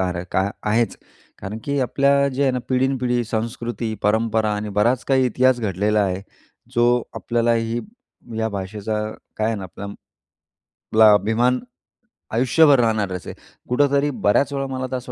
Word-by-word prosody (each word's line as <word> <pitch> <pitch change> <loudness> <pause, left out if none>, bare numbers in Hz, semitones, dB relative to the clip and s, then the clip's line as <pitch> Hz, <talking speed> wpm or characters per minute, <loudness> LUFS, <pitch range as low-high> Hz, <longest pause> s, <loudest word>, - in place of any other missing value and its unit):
आहे 90 -1 -2
काय 95 +1 +1
आहेच. 110 +2 +1 0.4
कारण 105 +3 -6
की 140 0 -1
आपल्या 140 +2 +2
जे 135 +1 -2
आहे 135 - +3
ना, 125 - -1
पिढीनपिढी 125 -2 +1
संस्कृती, 115 0 -3
परंपरा 110 0 +1
आणि 105 0 -4
बराच 120 +4 +2
काही 130 -1 +3
इतिहास 125 +1 +2
घडलेला 105 +1 +1
आहे, 95 0 -2 0.5
जो 120 0 +4 0.3
आपल्यालाही 115 0 0 0.6
या 110 0 0
भाषेचा 105 +2 -3 0.3
काय 110 - 0
आहे 115 - 0
ना, 100 - -6
आपल्याला 100 +3 -8 1.0
आपला 110 -1 +7
अभिमान 115 +5 +2 0.7
आयुष्यभर 135 +4 +5
राहणारच 105 -6 0
आहे. - - -4
असे - - -10 0.4
कुठेतरी 140 +2 +2
बऱ्याच 140 +3 +1
वेळा 135 -1 -2
मला 130 -1 -4
असं 125 0 -8
115 Hz, 145 wpm, -21 LUFS, 105-130 Hz, 1.0 s, आपला